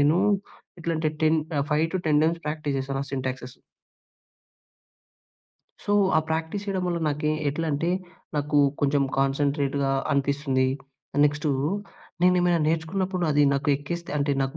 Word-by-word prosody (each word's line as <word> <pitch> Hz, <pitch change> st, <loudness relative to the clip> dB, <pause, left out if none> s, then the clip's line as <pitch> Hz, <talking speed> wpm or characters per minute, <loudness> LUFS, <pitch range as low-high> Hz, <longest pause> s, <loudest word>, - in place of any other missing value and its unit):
నేను 145 Hz, +3 st, +4 dB, 0.6 s
ఎట్లంటే 160 Hz, -2 st, 0 dB
టెన్ 155 Hz, +1 st, +4 dB, 0.2 s
ఆహ్, 140 Hz, -, +1 dB
5-10 160 Hz, -1 st, +2 dB
టైమ్స్ 165 Hz, +1 st, +1 dB
ప్రాక్టీస్ 150 Hz, -2 st, -2 dB
జేశానా 135 Hz, +1 st, -2 dB
సింటాక్సెసు. 130 Hz, -1 st, -4 dB, 2.3 s
సో, 205 Hz, -, 0 dB, 0.2 s
ఆ -, -, +6 dB
ప్రాక్టీస్ 160 Hz, +5 st, -2 dB
చేయడం 195 Hz, -2 st, -1 dB
వల్ల 175 Hz, -1 st, 0 dB
నాకే 150 Hz, +1 st, 0 dB, 0.2 s
ఎట్లంటే, 160 Hz, +2 st, -1 dB, 0.5 s
నాకు 145 Hz, 0 st, +1 dB, 0.2 s
కొంచెం 145 Hz, 0 st, +2 dB, 0.2 s
కాన్సంట్రేటుగా 140 Hz, 0 st, +1 dB, 0.2 s
అనిపిస్తుంది. 140 Hz, -1 st, +1 dB, 0.5 s
ఆహ్, 145 Hz, -, +2 dB
నెక్స్టూ, 145 Hz, +1 st, +1 dB, 0.7 s
నేనేమైనా 180 Hz, -1 st, +4 dB
నేర్చుకున్నప్పుడు 180 Hz, +3 st, -1 dB
అది 145 Hz, 0 st, +4 dB
నాకు 140 Hz, +1 st, -1 dB
ఎక్కేస్తే, 170 Hz, +5 st, -6 dB
అంటే 140 Hz, 0 st, +1 dB
నాకు 135 Hz, 0 st, -3 dB
150 Hz, 120 wpm, -25 LUFS, 140-165 Hz, 2.3 s, ఆ